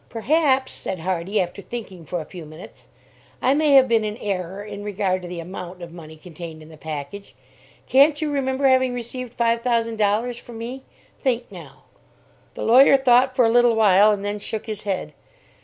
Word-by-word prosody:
"Perhaps," 265 +2 +1
said 185 -3 -6
Hardy, 185 +3 -1
after 180 +1 -3
thinking 195 -8 -8
for 175 - -3
a - - -9
few 175 0 -10
minutes, 155 +3 -13 0.5
"I 260 - +2
may 300 0 +3
have 265 -1 +7
been 230 -2 +2
in 210 0 -4
error 195 -1 -4
in 205 -1 -8
regard 195 -2 -1
to 180 - -8
the 175 -1 -6
amount 180 +1 -8
of 170 -1 -9
money 160 -2 -11
contained 160 -1 -10
in 155 - -15
the 160 - -13
package. 155 +5 -7 0.5
Can't 285 +3 +5
you 310 -2 -2
remember 270 -1 -1
having 260 -1 +3
received 245 0 -7
five 230 0 +1
thousand 230 -2 0
dollars 220 +4 0
from 240 -1 -11
me? 245 +4 -6 0.4
Think 245 -4 -1
now!" 165 -8 -12 0.7
The - - -5
lawyer 265 +4 +6
thought 255 0 +3
for 250 -3 +4
a 225 - +3
little 240 -1 +4
while, 210 -1 +5
and 205 -1 -2
then 205 +1 -3
shook 215 +1 -5
his 215 -2 -5
head. 185 -6 -3
215 Hz, 190 wpm, -22 LUFS, 180-245 Hz, 0.7 s, have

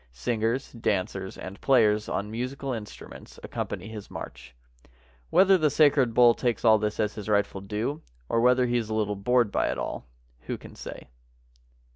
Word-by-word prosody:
Singers, 115 - -2
dancers, 95 -4 -2
and 95 +2 -9
players 110 -5 +3
on 105 +2 -3
musical 130 +3 -4
instruments 105 -3 -9
accompany 95 +3 -5
his 110 -2 -9
march. 65 - -9 0.7
Whether 190 -1 +5
the 155 -2 +3
sacred 140 -5 +3
bull 120 -1 +7
takes 120 0 -2
all 110 -1 +6
this 105 0 -2
as 105 0 0
his 105 -1 -7
rightful 100 -2 +1
due, 105 +8 -3 0.3
or 115 - +1
whether 125 +1 +4
he 120 0 +1
is 115 -2 -3
a - - -2
Uttle 105 -2 -2
bored 120 -2 +3
by - - +1
it - - -2
all, - - -5 0.4
who - - -3
can - - -13
say? - - -9
110 Hz, 170 wpm, -27 LUFS, 105-125 Hz, 0.7 s, bull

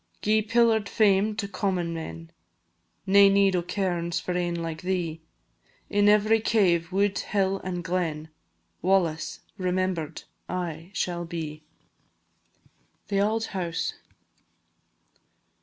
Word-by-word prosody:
Gi'e 215 +1 +3
pillar'd 230 -3 +3
fame 210 0 +3
to 205 -2 -3
common 185 -4 -1
men, 80 - -7 0.7
Nae 200 0 +7
need 195 -1 +4
o' 180 - +2
cairns 175 -2 -1
for 180 - -4
ane 175 -1 0
like 165 -1 -4
thee; 175 -3 -2 0.7
In 205 0 +4
every 215 +2 +4
cave, 180 -6 +2
wood, 200 +1 +1
hill, 195 -1 0
and 180 -1 -4
glen, 165 -3 -2 0.5
"WALLACE" 175 -3 +1 0.2
remember'd 185 -3 -1 0.3
aye 170 -2 -4
shall 175 -3 -1
be. 160 -2 -5 1.5
THE 200 -1 +2
AULD 220 +2 +1
HOUSE. 170 -3 -2
185 Hz, 110 wpm, -26 LUFS, 170-200 Hz, 1.5 s, Nae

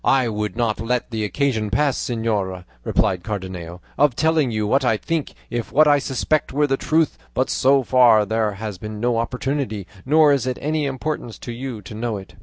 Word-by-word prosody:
"I 130 -3 +3
would 105 -2 -3
not 115 -2 0
let 125 +2 -1
the 110 -1 -2
occasion 110 -1 0
pass, 135 +6 +2
señora," 105 -6 -2 0.2
replied 90 -2 +1
Cardenio, 90 -3 -6 0.2
"of 145 -4 +4
telling 160 -2 +2
you 110 -2 -1
what 135 +6 +2
I 115 -4 +2
think, 165 +5 -3 0.2
if 120 -1 -3
what 155 +2 +5
I 145 -1 +5
suspect 140 +3 -1
were 145 +2 +2
the 135 -2 +1
truth, 155 +2 +1 0.2
but 130 - +1
so 135 +1 +3
far 120 -4 +5
there 110 0 0
has 100 -1 -6
been 105 +1 -6
no 120 0 +1
opportunity, 125 -3 -2 0.2
nor 150 +1 +5
is 130 -3 0
it 130 - -1
of - - -13
any 155 0 0
importance 135 -3 -4
to 120 - -4
you 120 -3 -6
to 90 - -9
know 110 0 -2
it." 95 -2 -11
120 Hz, 205 wpm, -22 LUFS, 105-140 Hz, 0.2 s, what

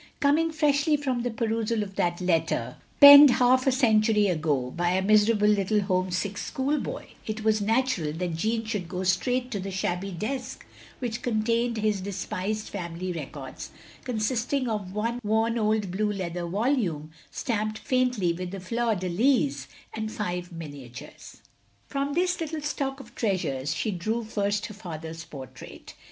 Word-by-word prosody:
Coming 300 +4 +3
freshly 300 -1 +2
from 260 -4 -1
the 245 - -1
perusal 225 -1 -1
of 195 -1 -9
that 175 0 0
letter, 160 -9 0 0.2
penned 285 0 +12
half 255 +1 +3
a - - +5
century 220 -4 +3
ago, 150 -7 0
by 175 +3 0
a 190 - +2
miserable 210 +1 +4
little 210 0 +2
home 185 -1 0
sick 195 +3 -2
schoolboy, 280 +3 -2 0.2
it 215 0 -4
was 215 -1 +2
natural 220 - +1
that 170 0 -3
Jeanne 225 +6 -1
should 210 -5 -3
go 180 0 -3
straight 250 +8 0
to 205 - -2
the 195 +1 -5
shabby 190 0 -2
desk 215 +9 -5 0.3
which 235 -3 -4
contained 230 +1 0
his 210 -2 0
despised 200 +2 -4
family 180 -1 -5
records; 140 -4 -7 0.3
consisting 245 +3 -1
of 210 -5 -3
one 230 +3 -1
worn 225 +2 +1
old 215 -3 +1
blue 210 +3 0
leather 175 -3 -4
volume, 190 - -1 0.2
stamped 215 -2 -2
faintly 250 -10 +1
with 180 +1 -5
the 195 +1 -6
fleur 230 +4 0
de 185 -1 -3
lys, 170 - +1 0.3
and 220 0 -4
five 180 -4 -4
miniatures. 145 -7 -10 0.4
From 280 0 -2
this 360 +2 0
little 320 -1 -3
stock 275 -2 -3
of 240 -3 -13
treasures, 175 - -1
she 220 - -1
drew 215 +6 -2
first 205 -1 -1
her 210 - -7
father's 165 -5 -7
portrait. 140 -5 -11
210 Hz, 155 wpm, -26 LUFS, 180-240 Hz, 0.4 s, penned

